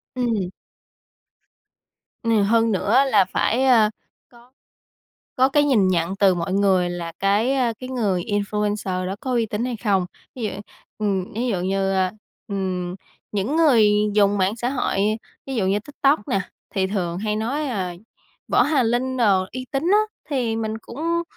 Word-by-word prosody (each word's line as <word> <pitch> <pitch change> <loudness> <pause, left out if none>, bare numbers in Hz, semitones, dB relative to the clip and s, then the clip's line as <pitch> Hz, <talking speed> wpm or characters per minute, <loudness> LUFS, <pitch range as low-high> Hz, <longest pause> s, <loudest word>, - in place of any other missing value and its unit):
Ừm. 230 -7 -1 1.7
Ừ, 225 -2 +3
hơn 225 +2 +3
nữa 225 +7 +3
là 205 -5 +5
phải, 225 +6 0
a, 230 -5 +5 0.4
có 240 0 -20 0.9
có 260 +1 +4
cái 290 +1 +3
nhìn 230 -10 +3
nhận 175 +1 0
từ 195 -2 +4
mọi 175 +1 -3
người 190 -2 +2
là 170 -1 -5
cái, 205 +6 +2
a, 250 -3 +1
cái 255 +3 -9
người 210 -8 0
influencer 205 -2 -1
đó 190 - -3
có 260 - -3
uy 235 -2 +1
tín 215 +2 -3
hay 250 -2 -3
không. 200 -4 +1 0.3
Ví 250 - -7
dụ, 215 - -1 0.5
ừm, 195 -3 -1
ví 235 +4 -2
dụ 200 -7 0
như, 195 +1 0
a, 185 -1 +1 0.4
ừm, 185 -3 -3 0.4
những 210 +9 -1
người 250 -10 +5 0.2
dùng 205 -1 +3
mạng 190 +3 +1
xã 240 +1 -2
hội, 255 -5 -1 0.5
ví 270 - -4
dụ 210 -6 0
như 195 +2 +2
TikTok 280 -1 0
nè, 195 - +1 0.3
thì 190 -1 +1
thường 180 -3 -2
hay 210 +1 -1
nói, 270 +8 -2
ờ, 190 -7 -2 0.6
Võ - - +4
Hà 290 -3 +2
Linh 245 +3 0
đồ 200 -6 +3
uy 255 0 -6
tín 275 0 0
á, 415 - +6 0.3
thì 245 -5 0
mình 220 -1 -3
cũng 330 +9 -2
215 Hz, 170 wpm, -22 LUFS, 195-250 Hz, 1.7 s, á